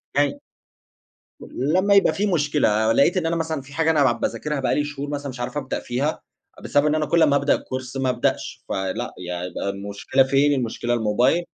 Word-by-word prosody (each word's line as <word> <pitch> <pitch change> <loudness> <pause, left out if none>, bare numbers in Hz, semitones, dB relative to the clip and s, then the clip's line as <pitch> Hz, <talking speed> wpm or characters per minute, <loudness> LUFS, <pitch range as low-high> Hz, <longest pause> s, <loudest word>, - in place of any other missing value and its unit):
يعني 145 -1 +1 1.0
لما 185 +10 +1
يبقى 200 - +5
في 205 - 0
مشكلة، 145 - +2
لقيت 140 +10 +3
إن 175 - 0
أنا 165 +1 0
مثلًا 160 -3 -2
في 140 +2 -15
حاجة 160 +1 +2
أنا 150 -3 +3
بع 130 - +4
بَاذاكِرها 125 +5 -2
بقى 130 - 0
لي 145 - +1
شهور 145 0 -5
مثلًا 145 -1 -4
مش 130 -1 -9
عارف 125 +3 -4
أبدأ 135 -3 -3
فيها، 135 +6 -2 0.4
بسبب 145 +1 +2
إن 150 - +2
أنا 155 -1 0
كل 170 +2 +3
ما 140 - +4
أبدأ 140 +1 +3
الكورس 130 0 -6
ما 130 -1 0
ابدأش، 125 - -2
فلأ، 95 +5 -3
يعني 90 0 -4
ده 100 - -3
المشكلة 100 +7 0
فين، 140 +2 +3
المشكلة 120 -2 -2
الموبايل، 120 +8 +2
140 Hz, 195 wpm, -23 LUFS, 120-150 Hz, 1.0 s, يبقى